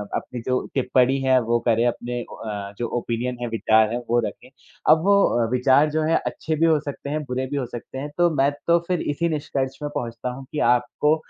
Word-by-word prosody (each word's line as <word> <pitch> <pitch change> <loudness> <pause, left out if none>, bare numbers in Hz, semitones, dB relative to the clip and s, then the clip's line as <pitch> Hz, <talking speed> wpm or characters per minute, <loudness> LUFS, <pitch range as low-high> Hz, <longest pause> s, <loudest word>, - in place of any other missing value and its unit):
अपनी 125 - -4
जो 130 0 +2
टिप्पणी 130 0 +2
है 130 -1 +4
वो 120 +1 +1
करे, 115 0 +3
अपने 120 0 -2
ओ - - -8
अ, 100 -2 -6
जो 120 - -2
ओपिनियन 120 +1 -2
है, 120 - -2
विचार 110 -1 +3
है - - 0
वो 120 - +3
रखें। - - -8 0.4
अब 160 +1 +6
वो 200 - +3
विचार 130 +4 +4
जो 155 0 0
है, 160 +1 +2
अच्छे 160 - -2
भी 165 +2 +2
हो 160 -2 +4
सकते 145 -1 -7
हैं, 150 +1 -2
बुरे 130 0 -3
भी 145 - -1
हो 130 - -1
सकते 120 +2 -8
हैं, 145 +2 -4
तो 175 0 +4
मैं 140 +1 +3 0.2
तो 170 0 +5
फिर 180 -2 0
इसी 165 +3 -1
निष्कर्ष 135 -3 -2
में 145 - -2
पहुँचता 115 +1 -3
हूँ 130 +2 -8
कि 150 - -3
आपको 150 +5 +1
130 Hz, 225 wpm, -23 LUFS, 120-150 Hz, 0.4 s, अब